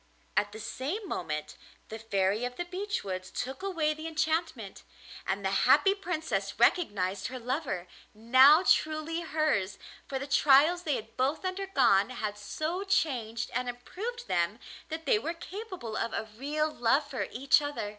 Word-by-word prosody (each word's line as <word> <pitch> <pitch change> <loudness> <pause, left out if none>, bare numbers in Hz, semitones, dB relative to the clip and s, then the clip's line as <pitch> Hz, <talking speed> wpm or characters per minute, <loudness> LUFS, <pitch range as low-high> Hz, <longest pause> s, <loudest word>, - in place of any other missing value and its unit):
At 205 - +1
the 215 - -9
same 320 - -4
moment 155 - -4 0.3
the 220 - -6
Fairy 205 0 0
of 245 0 -3
the 350 - -3
Beech 395 +4 -3
Woods 185 -2 -5
took 265 +5 -5
away 330 -6 0
the 310 +1 -7
enchantment, 315 - -2 0.5
and 195 +1 -1
the 190 - +1 0.2
happy 390 +8 +6
Princess 360 -5 -3
recognised 200 - +2
her 255 - -6
lover, 250 - -3 0.3
now 260 - +6
truly 315 -1 +1
hers, 305 - 0 0.3
for 270 - -3
the 270 - -4
trials 290 +5 +5
they 295 -4 +1
had 225 +1 -7
both 275 +7 0
undergone 280 - +2
had 215 -4 -4
so 310 - -3
changed 245 - 0
and 250 0 -1
improved 400 - -6
them 180 +2 0 0.3
that 320 +1 -5
they 445 -4 +3
were 335 -4 -4
capable 365 - -7
of 230 0 -2
a - - -1
real 300 +5 -1
love 270 +5 +2
for 275 -3 -3
each 275 +4 +4
other. 290 -8 -3
275 Hz, 160 wpm, -29 LUFS, 220-330 Hz, 0.5 s, happy